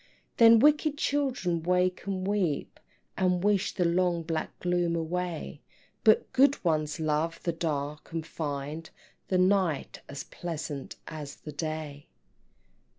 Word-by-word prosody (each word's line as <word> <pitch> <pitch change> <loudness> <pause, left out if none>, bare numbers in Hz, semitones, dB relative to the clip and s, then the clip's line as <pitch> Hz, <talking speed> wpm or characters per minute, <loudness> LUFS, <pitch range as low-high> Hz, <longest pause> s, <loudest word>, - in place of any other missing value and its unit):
Then 230 0 +8
wicked 300 +3 +4
children 260 - 0
wake 180 +2 +1
and 190 -1 -2
weep, 190 -8 -1 0.4
And 180 -1 +1
wish 205 -2 +2
the 180 - +1
long 170 0 +2
black 160 -1 -4
gloom 175 -1 +1
away; 165 -2 -3 0.4
But 215 - +4
good 280 +2 +4
ones 155 -2 0
love 155 +1 0
the 170 - 0
dark, 150 -3 -3
and 165 -1 -3
find 150 0 -5 0.4
The 185 - +1
night 185 -5 +1
as 140 0 -6
pleasant 155 -6 -6
as 150 -3 -7
the 150 - -9
day. 150 -1 -5
170 Hz, 130 wpm, -29 LUFS, 155-185 Hz, 0.4 s, Then